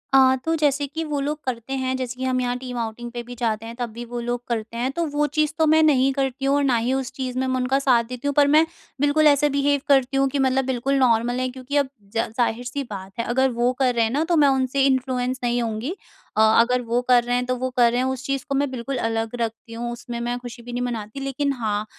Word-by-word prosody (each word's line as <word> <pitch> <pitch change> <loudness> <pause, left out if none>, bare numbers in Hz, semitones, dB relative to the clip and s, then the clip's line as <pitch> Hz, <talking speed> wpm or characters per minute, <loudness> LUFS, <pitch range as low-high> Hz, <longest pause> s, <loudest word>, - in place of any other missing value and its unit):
आ 260 -1 +6
तो 325 0 +1
जैसे 290 -2 +1
कि 320 +4 -4
वो 300 -2 -2
लोग 295 +2 -2
करते 250 0 -4
हैं, 260 -1 -1
जैसे 250 -1 -4
कि - - -3
हम 255 -1 +1
यहाँ 245 0 -1
टीम 250 -1 -6
आउटिंग 235 +1 -4
पे 240 0 -5
भी 245 +1 -9
जाते 225 -2 -1
हैं, 230 +1 -8
तब 240 -1 -2
भी 240 +1 -7
वो 240 +1 -5
लोग 240 +1 -3
करते 230 -1 -3
हैं। 250 +3 -1
तो 335 +4 -1
वो 295 0 +3
चीज़ 305 -1 +3
तो 320 - +3
मैं 315 +1 +5
नहीं 275 -3 +4
करती 270 -1 -2
हूँ 275 +1 +3
और 285 - +2
ना 260 -4 +3
ही 235 +3 0
उस 265 -2 -2
चीज़ 255 -2 -4
में 260 - 0
मैं 260 - 0
उनका 255 +1 +1
साथ 255 -4 +3
देती 250 +4 -6
हूँ। 285 - +1
पर 290 -1 +5
मैं 305 +3 +5 0.4
बिल्कुल 295 +2 +4
ऐसे 295 0 +4
बिहेव 280 0 +1
करती 270 -2 +3
हूँ 275 0 +3
कि 280 - -2
मतलब 265 0 +2
बिल्कुल 265 +1 0
नॉर्मल 245 0 +2
है, 255 0 -1
क्योंकि 260 +3 -4
अब 280 -2 +2 0.3
ज 225 - +1
ज़ाहिर-सी 245 +3 -1
बात 195 -2 -7
है, - - +1
अगर 260 +2 +2
वो 240 +1 +1
कर 255 -2 +3
रहे 230 - +3
हैं 225 - 0
ना, 290 +5 +1
तो 340 +1 +1
मैं 290 -2 +6
उनसे 265 0 +1
इन्फ्लुएंस 260 -1 0
नहीं 240 0 +1
होऊँगी। 230 +5 -3 0.5
अ, - - +5
अगर 230 +3 +4
वो 240 +1 0
कर 250 -1 +4
रहे 245 +1 0
हैं, 250 0 0
तो 255 0 -1
वो 255 +1 -2
कर 240 -1 +5
रहे 245 - 0
हैं, - - 0
उस 265 0 -4
चीज़ 275 -1 -2
को 275 - 0
मैं 280 0 +1
बिल्कुल 260 +1 -4
अलग 225 -1 -1
रखती 230 0 -4
हूँ। 235 +1 -4
उसमें 240 0 -6
मैं 240 +1 -2
खुशी 245 0 -9
भी 245 +1 -9
नहीं 245 - -2
मनाती, 230 0 -4
लेकिन 275 +1 -1
हाँ, 215 -4 -2
255 Hz, 275 wpm, -23 LUFS, 240-275 Hz, 0.5 s, आ